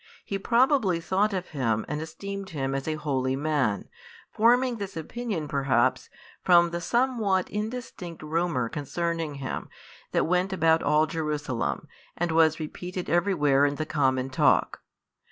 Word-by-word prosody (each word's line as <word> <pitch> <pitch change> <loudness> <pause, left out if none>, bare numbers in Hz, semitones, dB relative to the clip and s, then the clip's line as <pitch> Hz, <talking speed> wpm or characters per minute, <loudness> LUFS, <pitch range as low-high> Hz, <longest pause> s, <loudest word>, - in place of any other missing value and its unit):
He 195 - -3
probably 235 - +3
thought 190 +5 +1
of 185 -2 -3
Him 115 -7 -1
and 150 +1 -3
esteemed 195 +5 -6
Him 135 -3 -2
as 135 +1 -3
a 155 - 0
holy 135 -4 -1
Man, 140 -8 0 0.4
forming 245 +2 +3
this 200 -4 -6
opinion 195 -1 -4
perhaps 135 -3 +1 0.3
from 175 -1 +5
the 170 0 -3
somewhat 225 -4 +1
indistinct 210 -6 -5
rumour 160 -5 0
concerning 160 +3 -3
Him 135 -2 -5 0.4
that - - +2
went 180 +3 +1
about 165 -3 +3
all 150 +2 +3
Jerusalem, 150 -5 -3 0.3
and 175 -1 0
was 160 -1 +4
repeated 180 +3 -5
everywhere 165 -6 +3
in 145 0 +2
the 155 - -3
common 130 -4 0
talk. - - +2
165 Hz, 140 wpm, -27 LUFS, 145-190 Hz, 0.4 s, from